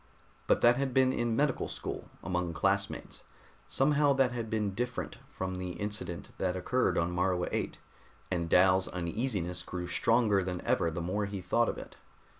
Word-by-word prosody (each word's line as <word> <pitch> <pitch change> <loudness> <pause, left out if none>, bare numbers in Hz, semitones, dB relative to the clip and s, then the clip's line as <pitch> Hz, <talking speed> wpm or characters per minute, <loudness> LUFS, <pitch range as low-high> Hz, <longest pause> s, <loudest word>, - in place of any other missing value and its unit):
But - - +3
that 120 +1 +6
had 135 -2 -1
been 130 0 +4
in 120 -2 0
medical 145 +1 +1
school, - - -5
among 90 -1 -1
classmates. 80 - -1 0.5
Somehow 145 +1 +3
that 135 -2 +3
had 115 -2 -4
been 105 -3 -1
different 125 +4 -3
from 95 0 -4
the 90 -1 -4
incident 105 -4 -4
that 95 -1 0
occurred 125 +8 +1
on 85 +1 +1
Morua 90 0 +1
VIII, - - -1 0.6
and 85 -2 -1
Dal's 95 +1 +5
uneasiness 90 0 -2
grew 90 0 -5
stronger 105 +1 +3
than 90 -1 -3
ever 85 - +1
the 80 +2 -4
more 100 +4 -1
he 100 -1 -5
thought 110 +6 +2
of - - -3
it. - - -10
95 Hz, 170 wpm, -31 LUFS, 90-120 Hz, 0.6 s, that